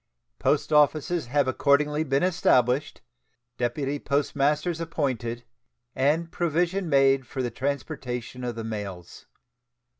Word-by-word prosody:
Post - - +1
offices 150 +1 +2
have 140 +1 +1
accordingly 150 +3 +2
been 135 0 0
established, 140 -7 +2 0.6
deputy 135 +4 -1
postmasters 150 +4 0
appointed, 125 -7 -2 0.5
and 155 +5 +1
provision 175 +2 0
made 135 -2 +3
for 130 - -4
the 120 - -2
transportation 130 -2 -4
of 120 -2 -3
the 115 - -5
mails. 100 -6 -7
140 Hz, 110 wpm, -26 LUFS, 125-155 Hz, 0.6 s, made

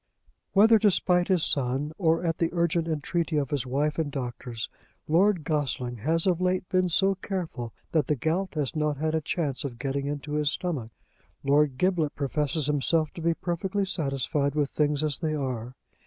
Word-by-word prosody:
Whether 220 +3 +6
to 210 - +5
spite 180 -1 +2
his 185 -4 +3
son, 135 +2 0
or 165 -1 +2
at 165 -1 -1
the 165 - +2
urgent 170 -1 +1
entreaty 160 +1 -1
of 140 -3 -1
his 135 -3 -1
wife 150 +5 0
and 150 -3 -1
doctors, 120 -3 -5 0.4
Lord 180 +2 +3
Gossling 130 -5 -1
has 160 +8 +2
of 180 -2 +2
late 180 0 0
been 185 -1 +2
so 195 +3 +3
careful, 180 - -4 0.2
that 155 -5 +2
the 150 - +2
gout 165 +8 -1
has 145 -2 -1
not 150 -2 0
had 155 +2 -1
a 160 - +1
chance 150 -4 -2
of 130 -4 -5
getting 140 +1 -2
into 145 +1 -4
his 150 -1 +1
stomach. 145 -12 -3 0.5
Lord 140 -1 +3
Giblet 175 -4 +1
professes 150 +2 0
himself 150 +2 +1
to 170 - -8
be 165 0 +1
perfectly 190 +4 -2
satisfied 140 -4 0
with 145 -2 0
things 150 -1 +1
as 150 -3 -1
they 155 -2 -1
are. 125 -3 -4
150 Hz, 185 wpm, -27 LUFS, 140-170 Hz, 0.5 s, Whether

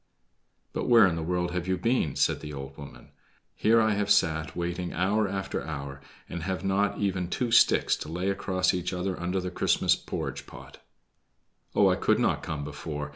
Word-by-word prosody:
"But - - -2
where 115 -4 +8
in 90 -4 +1
the 85 - -3
world 90 +1 -1
have 90 0 -3
you 95 0 +1
been?" 105 - 0
said - - +1
the 75 - -8
old 70 0 -7
woman. 70 -1 -12 0.4
"Here 115 +2 +3
I 110 -1 +3
have 105 -1 -1
sat 80 -6 +2
waiting 85 0 -3
hour 100 +4 +1
after 95 0 -3
hour, 70 -3 -6 0.3
and 85 - -6
have 95 +2 -3
not 100 +1 +1
even 95 -3 -1
two 120 +5 -1
sticks 120 +1 +5
to - - -7
lay 90 +4 -1
across 95 -1 0
each 90 0 -2
other 90 +1 -3
under 90 +2 -1
the 90 0 -4
Christmas - - +2
porridge - - -5
pot." - - -12 1.0
"Oh, - - +5
I - - +3
could - - +2
not - - +1
come 75 -2 -4
before. 75 0 -5
90 Hz, 190 wpm, -27 LUFS, 80-100 Hz, 1.0 s, where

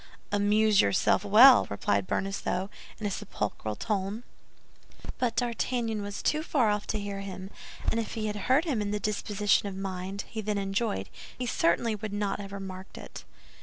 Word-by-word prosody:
"Amuse 205 0 +4
yourself 100 - +2
well!" 230 +6 +8
replied 100 -1 0
Bonacieux, 195 - -2 0.3
in 215 - -4
a 205 - 0
sepulchral 110 - -3
tone. 205 - -2 1.0
But 240 -2 0
D'Artagnan 235 -2 -1
was 205 0 -5
too 305 - +2
far 260 -9 +2
off 210 0 -2
to 215 - -1
hear 200 -1 -4
him; 195 0 -7 0.4
and 230 - 0
if 225 - -4
he 220 -1 -2
had 210 -1 -2
heard 270 +6 +4
him 265 -10 0
in 205 - -2
the 210 0 -1
disposition 205 0 +1
of 195 - -5
mind 190 0 -4
he 220 - -5
then 210 0 -1
enjoyed, 195 - -1 0.3
he 250 - -3
certainly 220 +1 +2
would 210 0 -5
not 205 -1 -1
have 195 -1 -8
remarked 190 -1 -8
it. - - -10
205 Hz, 170 wpm, -29 LUFS, 195-220 Hz, 1.0 s, well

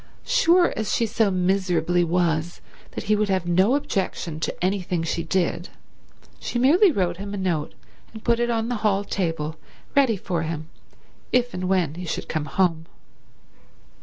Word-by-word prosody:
Sure 350 +1 +4
as 220 - -2
she 230 - +2
so 220 -1 +1
miserably 180 -2 +1
was 170 -1 0 0.3
that - - -5
he 210 - +2
would 210 -1 0
have 190 -2 +1
no 185 +8 +3
objection 185 - -2
to 165 - -2
anything 180 -3 -1
she 165 +1 -1
did, 175 +1 -1 0.7
she - - -3
merely 330 - +5
wrote 180 - 0
him 200 +1 -5
a - - -4
note 175 -6 -2 0.4
and 220 -1 -10
put 235 -1 +2
it 240 0 +1
on 225 -1 0
the 245 -1 -1
hall 205 -2 +2
table 165 -6 -2 0.4
ready 265 -7 +4
for 180 -2 -2
him 160 -1 -4 0.6
if 245 -1 +2
and 185 0 -3
when 180 -6 +1
he 180 +2 -7
should - - -3
come 155 -2 -2
home. 165 0 0
185 Hz, 165 wpm, -24 LUFS, 170-220 Hz, 0.7 s, merely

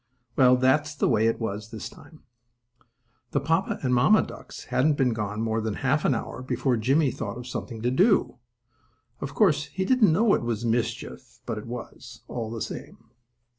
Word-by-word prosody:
Well, 125 -1 +6
that's 145 +4 +2
the - - +1
way 110 +1 +3
it 115 - 0
was 110 -1 -4
this 110 -2 -6
time. 155 - -16 1.1
The - - +3
papa 165 0 0
and 125 -1 +1
mamma 125 - +5
ducks - - -10
hadn't 145 +2 +3
been 125 -4 +2
gone 105 0 -3
more 110 0 0
than 110 -2 -2
half 140 +4 0
an 135 - +3
hour 115 - -5
before 130 0 0
Jimmie 135 +5 +2
thought 115 - -5
of 125 - -8
something 115 -2 -6
to 125 - +1
do. 190 - +3 0.8
Of 140 +1 -6
course, 155 -8 +3
he 190 - -3
didn't 235 -5 +4
know 205 +5 +3
it - - +2
was 120 -1 -2
mischief 120 +2 -3
but 115 -3 -3
it 105 - -10
was, 120 0 -9
all 115 -3 -4
the 115 -1 -4
same. 115 -1 -9
125 Hz, 185 wpm, -26 LUFS, 115-150 Hz, 1.1 s, Well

